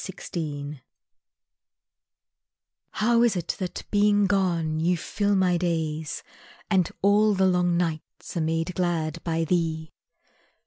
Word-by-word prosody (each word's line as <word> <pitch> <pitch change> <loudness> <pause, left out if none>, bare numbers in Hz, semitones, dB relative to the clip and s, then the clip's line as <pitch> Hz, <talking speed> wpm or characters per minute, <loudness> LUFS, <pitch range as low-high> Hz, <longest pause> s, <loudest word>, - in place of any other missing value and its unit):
Mirage 150 -6 -5 2.1
How 235 +2 +2
is 235 -4 +3
it 175 -2 -4
that, 185 -2 -4
being 205 0 +4
gone, 170 -5 +1
you 175 +2 +2
fill 205 +5 0
my 185 -2 +3
days, 160 -4 -2 0.5
And 185 -4 +3
all 205 +1 +4
the 190 0 +3
long 180 -2 +2
nights 165 -1 -4
are 170 - 0
made 165 +2 -1
glad 170 -3 -1
by 165 -1 0
thee? 160 -2 -1
175 Hz, 120 wpm, -25 LUFS, 160-190 Hz, 2.1 s, being